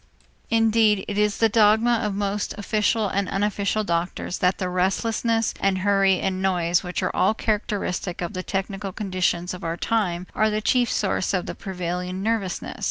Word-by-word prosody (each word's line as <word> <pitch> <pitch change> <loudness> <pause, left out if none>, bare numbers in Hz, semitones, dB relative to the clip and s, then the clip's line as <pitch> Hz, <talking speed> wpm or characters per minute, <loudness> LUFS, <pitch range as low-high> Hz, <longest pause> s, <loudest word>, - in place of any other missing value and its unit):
Indeed 225 -2 +3
it 205 - -3
is 210 -1 +2
the 225 - +4
dogma 220 +2 +4
of 210 -3 -2
most 200 0 -2
official 210 +1 +1
and 195 0 -1
unofficial 205 +1 0
doctors 170 0 -2
that 180 +1 +2
the 185 - -2
restlessness 225 +5 0
and 195 -1 +1
hurry 195 -1 +3
and 190 -1 -1
noise 175 -2 +2
which 180 +1 -4
all 180 - 0
are 190 - +3
characteristic 205 -5 -2
of 175 -1 -4
the 185 - -3
technical 195 +1 -3
conditions 185 -3 -1
of 180 0 -8
our 165 0 -2
time 180 -4 -1
are 215 +1 +2
the 215 0 0
chief 245 +2 +2
sources 195 -1 0
of 180 - -1
the - - -5
prevailing 180 0 -4
nervousness. 215 -5 -2
195 Hz, 170 wpm, -24 LUFS, 185-215 Hz, -, the